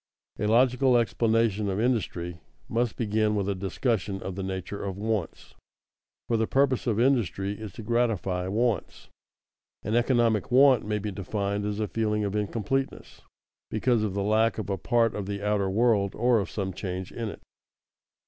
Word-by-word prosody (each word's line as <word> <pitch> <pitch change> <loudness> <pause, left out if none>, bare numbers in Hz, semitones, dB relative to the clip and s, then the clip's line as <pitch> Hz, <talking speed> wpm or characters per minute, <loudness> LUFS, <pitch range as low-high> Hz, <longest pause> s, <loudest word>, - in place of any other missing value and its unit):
_A 105 - 0
logical 125 +2 +4
explanation 115 -3 +1
of 95 +1 -1
industry 90 -8 -1 0.3
must 115 -3 0
begin 110 -1 +1
with 100 -2 -1
a 100 - +1
discussion 95 +1 -1
of 95 - -4
the 95 - -5
nature 95 +1 -4
of 95 -1 -4
wants, 105 -4 -3 0.7
for 115 - +1
the 110 0 +1
purpose 135 -2 +1
of 110 -2 +1
industry 115 -6 +1
is 110 -3 -7
to 115 - -8
gratify 105 -6 0
wants._ 110 0 -1 0.8
An 110 - -1
economic 120 -3 +2
want 130 -1 +6
may 105 0 0
be 105 0 -4
defined 100 +1 -2
as 105 0 -2
a 110 - 0
feeling 105 0 -1
of 100 0 -2
incompleteness, 115 +6 -2 0.5
because 115 +1 +1
of 105 -3 -2
the 100 - 0
lack 110 +2 +2
of 105 -2 -3
a 95 - -1
part 115 +5 +2
of 100 -2 -4
the 100 0 -4
outer 105 -2 +1
world 105 -1 +2
or 120 0 +3
of 95 - -3
some 95 -3 -3
change 90 0 -5
in 115 -2 -4
it. - - -10
105 Hz, 170 wpm, -27 LUFS, 100-115 Hz, 0.8 s, want